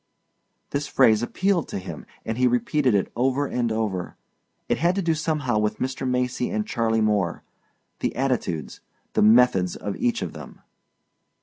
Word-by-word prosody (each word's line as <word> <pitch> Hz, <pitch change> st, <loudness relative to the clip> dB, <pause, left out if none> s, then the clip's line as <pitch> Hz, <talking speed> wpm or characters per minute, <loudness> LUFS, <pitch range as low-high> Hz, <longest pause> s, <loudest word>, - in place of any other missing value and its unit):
This 145 Hz, 0 st, -2 dB
phrase 115 Hz, -5 st, +4 dB
appealed 180 Hz, +7 st, 0 dB
to -, -, -4 dB
him 90 Hz, -5 st, -8 dB, 0.2 s
and 110 Hz, -, -2 dB
he 125 Hz, -, +4 dB
repeated 125 Hz, 0 st, +2 dB
it 100 Hz, -, 0 dB
over 135 Hz, +3 st, +1 dB
and 120 Hz, -4 st, -1 dB
over. 105 Hz, -5 st, -2 dB, 0.5 s
It -, -, 0 dB
had 175 Hz, +3 st, +2 dB
to 195 Hz, -, 0 dB
do 165 Hz, -1 st, +2 dB
somehow 150 Hz, -7 st, 0 dB
with 105 Hz, 0 st, 0 dB
Mr. 130 Hz, 0 st, -2 dB
Macy 125 Hz, 0 st, 0 dB
and 215 Hz, 0 st, -1 dB
Charley 115 Hz, -, 0 dB
Moore 105 Hz, -5 st, 0 dB, 0.6 s
the -, -, -2 dB
attitudes, 120 Hz, -, -2 dB, 0.3 s
the -, -, +2 dB
methods 105 Hz, -5 st, +5 dB
of 100 Hz, -, -4 dB
each 240 Hz, -2 st, 0 dB
of -, -, -5 dB
them. -, -, -11 dB
125 Hz, 165 wpm, -24 LUFS, 105-140 Hz, 0.6 s, methods